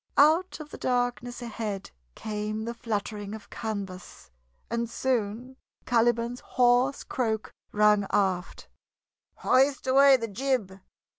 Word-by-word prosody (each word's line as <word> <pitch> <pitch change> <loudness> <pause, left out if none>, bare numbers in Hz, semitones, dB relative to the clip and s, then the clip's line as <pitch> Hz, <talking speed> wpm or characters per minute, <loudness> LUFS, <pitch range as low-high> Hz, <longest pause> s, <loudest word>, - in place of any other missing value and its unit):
Out 320 +6 +4
of 300 -1 -9
the - - -9
darkness 245 0 -1
ahead 215 -4 -5 0.2
came 215 0 -4
the 235 - -3
fluttering 210 -3 -4
of 220 - -13
canvas, 195 - -6 0.4
and 235 0 -2
soon 245 0 -2 0.3
Caliban's 240 0 +1
hoarse 250 +2 +2
croak 220 -4 -2 0.2
rang 210 -1 +4
aft: 190 -2 -1 0.7
"Hoist 270 +1 +2
away 270 +1 +6
th' 230 -4 -5
jib!" 220 -6 -1
235 Hz, 115 wpm, -27 LUFS, 210-255 Hz, 0.7 s, away